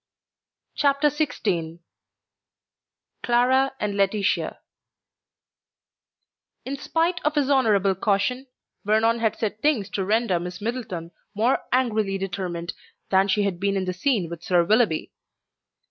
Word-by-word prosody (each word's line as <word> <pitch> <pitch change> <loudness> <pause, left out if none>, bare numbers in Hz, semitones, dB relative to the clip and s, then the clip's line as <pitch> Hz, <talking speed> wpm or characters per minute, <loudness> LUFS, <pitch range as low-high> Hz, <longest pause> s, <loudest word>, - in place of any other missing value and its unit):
CHAPTER 285 +1 +2
XVI 195 - -2 1.4
CLARA 260 +3 +2
AND 205 -1 -2
LAETITIA 200 0 0 2.1
In 275 - -3
spite 335 +5 0
of 300 +1 0
his 285 -1 +1
honourable 210 -8 +3
caution, 205 +7 0 0.4
Vernon 220 +2 +2
had 220 -2 +1
said 215 -1 -3
things 235 -10 +1
to 195 - -1
render 210 -2 +1
Miss 180 +1 -6
Middleton 205 -7 -4 0.2
more 230 +5 +2
angrily 220 -6 +1
determined 180 -3 -4 0.4
than 190 +1 +4
she 205 +1 +2
had 195 -3 -2
been 200 0 0
in 190 - -1
the 185 - -2
scene 200 -2 0
with 170 0 -8
Sir 175 -1 +2
Willoughby. 210 -3 +2
210 Hz, 120 wpm, -24 LUFS, 190-255 Hz, 2.1 s, than